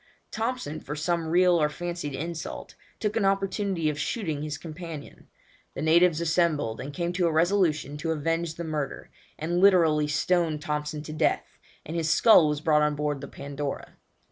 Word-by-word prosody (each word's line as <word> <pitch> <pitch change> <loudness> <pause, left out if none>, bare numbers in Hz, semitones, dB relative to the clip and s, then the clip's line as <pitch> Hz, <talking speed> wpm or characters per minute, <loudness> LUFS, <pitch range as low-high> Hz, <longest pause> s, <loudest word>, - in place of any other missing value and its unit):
Thompson, 220 - -3
for 150 - -6
some 165 +1 -1
real 175 0 +4
or 150 - +3
fancied 170 -3 -5
insult, 165 +3 -6 0.3
took 210 -1 -1
an 225 - +1
opportunity 195 -3 0
of 150 -1 -1
shooting 160 -7 -2
his 150 -1 -4
companion. 165 -2 -9 0.5
The 140 - -3
natives 165 +1 +4
assembled, 165 -9 +1
and 140 - -6
came 170 +2 -2
to 180 -1 +1
a - - +1
resolution 160 -4 +1
to 160 +2 -4
avenge 165 +1 -1
the 170 - -5
murder, 150 -4 -4 0.3
and 170 +3 -1
literally 165 -6 +5
stoned 160 +1 +1
Thompson 150 0 -3
to 155 - -7
death, 155 - -1 0.3
and 160 - -6
his 165 -1 0
skull 175 -2 +6
was 150 0 -1
brought 155 -2 +3
on 150 0 +2
board 145 -1 -2
the 140 - -6
Pandora. 140 0 -6
160 Hz, 170 wpm, -27 LUFS, 150-175 Hz, 0.5 s, skull